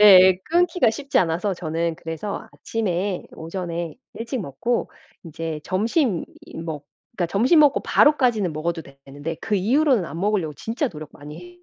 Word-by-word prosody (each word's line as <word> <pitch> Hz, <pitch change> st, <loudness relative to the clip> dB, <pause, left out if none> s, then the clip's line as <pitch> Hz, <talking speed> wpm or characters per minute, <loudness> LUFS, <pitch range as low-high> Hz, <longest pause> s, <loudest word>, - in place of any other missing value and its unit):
예예. 190 Hz, -3 st, +8 dB
끊기가 345 Hz, -6 st, +3 dB
쉽지 275 Hz, +5 st, -3 dB
않아서 180 Hz, +3 st, +1 dB
저는 165 Hz, -1 st, -2 dB
그래서 165 Hz, +6 st, -5 dB
아침에 195 Hz, -3 st, -2 dB
오전에 170 Hz, 0 st, -4 dB, 0.2 s
일찍 230 Hz, +2 st, -4 dB
먹고 210 Hz, -, -2 dB, 0.3 s
이제 165 Hz, -1 st, -5 dB
점심이 215 Hz, -, +1 dB, 0.3 s
먹 160 Hz, -3 st, -5 dB, 0.4 s
점심 250 Hz, -, +4 dB
먹고 295 Hz, -2 st, +5 dB
바로까지는 245 Hz, -, +3 dB
먹어도 165 Hz, +2 st, -2 dB
되는데 140 Hz, +3 st, -8 dB
그 215 Hz, -, -1 dB
이후로는 245 Hz, -, +3 dB
안 165 Hz, -, -7 dB
먹으려고 195 Hz, -6 st, 0 dB
진짜 230 Hz, -, -2 dB
노력 155 Hz, -6 st, -9 dB
많이 175 Hz, +5 st, -11 dB
185 Hz, 320 characters per minute, -23 LUFS, 165-230 Hz, 0.4 s, 예예